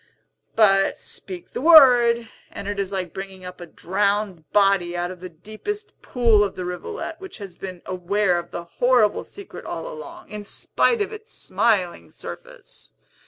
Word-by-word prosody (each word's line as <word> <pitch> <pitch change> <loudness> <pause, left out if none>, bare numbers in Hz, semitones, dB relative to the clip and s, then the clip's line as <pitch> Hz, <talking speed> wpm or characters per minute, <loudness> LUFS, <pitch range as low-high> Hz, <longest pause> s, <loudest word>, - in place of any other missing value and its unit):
But 195 -3 +4
speak 360 -2 -8
the - - -4
word, 245 -7 +7 0.2
and 200 - -8
it 205 0 -3
is 195 -1 -2
like 185 -4 -3
bringing 190 -1 -8
up 180 0 -9
a 175 - -8
drowned 200 -2 -1
body 195 -4 +3
out 175 +1 -2
of 185 - -10
the 185 +1 -8
deepest 215 - -7
pool 230 -4 +3
of 200 - -3
the 180 - -4
rivulet, 320 - -5
which 380 -1 -9
has 195 -4 -9
been 185 -2 -8
aware 185 0 +1
of 175 - -9
the 170 - -6
horrible 230 +4 +2
secret 400 -2 -11
all - - -5
along, 360 -8 -9
in 210 0 -6
spite 420 - +1
of 410 - -7
its 435 +1 -10
smiling 200 -7 0
surface. - - -11
205 Hz, 165 wpm, -23 LUFS, 185-270 Hz, 0.2 s, word